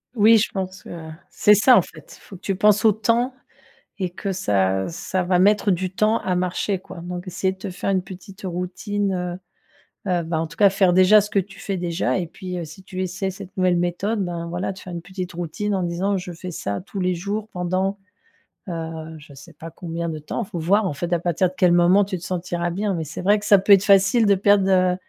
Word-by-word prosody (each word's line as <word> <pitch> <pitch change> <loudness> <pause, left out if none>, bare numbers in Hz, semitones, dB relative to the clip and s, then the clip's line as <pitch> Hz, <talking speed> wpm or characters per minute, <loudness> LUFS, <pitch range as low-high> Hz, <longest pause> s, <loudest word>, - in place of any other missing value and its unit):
Oui, 225 +1 +6
je 215 - 0
pense 190 -1 -5
que, 160 -2 -9 0.2
c'est 210 - +5
ça 245 +5 +6
en - - +6
fait, - - -13
il - - -23
faut 195 - -12
que - - -14
tu 195 - -2
penses 210 +3 +3
au 220 - +7
temps 235 +4 0 0.6
et 185 -3 -2
que 195 +2 -4
ça 95 - 0
ça 180 +2 -3
va 180 0 +2
mettre 205 +1 +4
du 185 +1 -1
temps 215 +4 +2
à 180 -1 -1
marcher, 185 +2 -1
quoi 180 -1 -11
donc 175 +1 -6
essayer 185 +1 -1
de 190 - -11
te 190 -1 -6
faire 180 - -3
une 190 -2 +1
petite 190 +2 -12
routine, 190 +3 -2
heu 180 -1 -3 0.7
heu, 175 -1 +1
bah 160 -1 -2
en 165 - -2
tout - - -13
cas 200 -2 +6
faire 190 -2 +3
déjà 185 +3 +7
ce 205 - -4
que 210 - 0
tu 195 +1 -11
fais 195 - -3
déjà 175 +1 -1
et 180 - -2
puis, 180 +2 -7
heu, 170 - -4
si 160 +4 -12
tu 185 0 -5
essaies 190 +1 -3
cette 190 0 -10
nouvelle 185 -1 +3
méthode, 185 +4 -1
ben, 170 -1 -4
voilà, 180 +3 -3
tu 190 - -12
fais 185 - -9
une 170 -1 -6
petite 185 -1 -7
routine 175 +5 -3
en 190 - 0
disant: 180 +3 -1
«Je 180 -1 -5
fais 175 +2 -7
ça 100 -11 -4
tous 195 +1 -7
les 180 0 +1
jours» 205 +5 -4
pendant, 185 +3 -1 0.7
heu, 160 -1 -6
je 150 -1 -14
sais 140 - -14
pas 165 - -9
combien 170 -1 -5
de 160 -2 -4
temps, 155 +9 -4
il 195 - -10
faut 170 - -5
voir 200 +6 +2
en 170 - -1
fait, 175 +5 -4
à 175 - +2
partir 175 +1 +1
de - - -15
quel 180 -3 +4
moment 180 +3 +5
tu 190 -1 -4
te 175 - -12
sentiras 175 -1 -2
bien, 200 +3 -1
mais 165 -3 -2
c'est 160 +3 -7
vrai 205 +3 +3
que 205 - -9
ça 205 -1 +7
peut 200 +1 +5
être 195 - +5
facile 200 +3 +4
de 200 -1 +5
perdre, 200 0 +3
heu, 185 -1 +3
185 Hz, 250 wpm, -22 LUFS, 175-200 Hz, 0.7 s, au